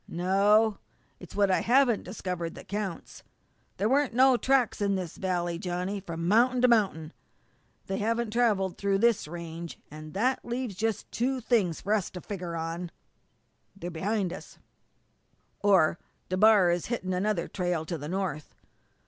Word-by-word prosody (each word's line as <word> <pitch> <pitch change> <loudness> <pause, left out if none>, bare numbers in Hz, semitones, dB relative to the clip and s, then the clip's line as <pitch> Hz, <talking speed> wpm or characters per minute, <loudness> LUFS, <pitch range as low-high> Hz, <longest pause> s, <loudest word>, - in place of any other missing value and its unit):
"No. 200 +4 +3 0.4
It's 180 - -12
what 200 -1 +3
I - - +3
haven't 245 -2 +3
discovered 180 -3 -5
that - - -11
counts. 200 -3 -5 0.6
There 200 - +1
weren't 270 0 +2
no 260 +1 +6
tracks 255 -3 +1
in 200 -1 +1
this 180 -4 -4
valley, 175 -2 -2
Johnny, 180 +2 -3
from 170 -3 -5
mount'in 245 +5 +4
to - - +7
mount'in. 195 -9 +1 0.7
They 195 - -3
haven't 230 +1 -1
travelled 210 -6 +1
through 200 -1 +1
this 230 -5 +2
range, 170 0 -7
an' 155 0 -9
that 250 +7 0
leaves 240 -2 -3
just 220 +2 -2
two 260 +3 -1
things 220 -9 +1
for 205 - 0
us 205 -4 0
to 180 - -8
figger 180 -4 -5
on. 165 +2 -4 0.9
They're 180 -2 -6
behind 185 +2 -1
us - - -11 1.0
or 185 -5 +3 0.3
DeBar 190 -1 +5
is 175 0 -1
hitting 190 -6 -2
another 185 -1 0
trail 180 -3 -1
into 160 +1 -5
the 150 +2 -6
north. 180 -5 -3
195 Hz, 155 wpm, -28 LUFS, 175-225 Hz, 1.0 s, to